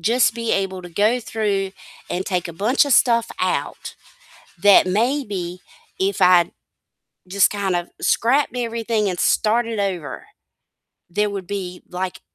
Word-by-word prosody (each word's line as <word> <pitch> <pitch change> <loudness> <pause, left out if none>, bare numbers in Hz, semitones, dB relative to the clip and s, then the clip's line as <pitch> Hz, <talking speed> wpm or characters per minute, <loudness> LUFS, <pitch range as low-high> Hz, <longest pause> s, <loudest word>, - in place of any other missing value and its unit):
just 230 +7 +2
be 230 -1 -2
able 190 -1 -1
to 175 - -9
go 215 +8 +2
through 205 -4 -2 0.4
and 185 +2 -2
take 180 -2 -2
a - - -7
bunch 220 - +2
of 285 - 0
stuff 235 -2 +3
out, 185 0 -2 0.7
that 200 -2 +7
maybe 200 -4 -1 0.4
if 195 +1 -1
I 180 -1 +5 0.8
just 195 +1 +3
kind 200 -3 -1
of 175 0 -3
scrapped 260 +3 +1
everything 230 -3 -1
and 180 - -5
started 225 0 +1
over, 185 -7 -3 0.8
there 210 +3 0
would 195 -2 -6
be, 185 -3 -5
like, 180 0 -4
200 Hz, 140 wpm, -21 LUFS, 185-230 Hz, 0.8 s, that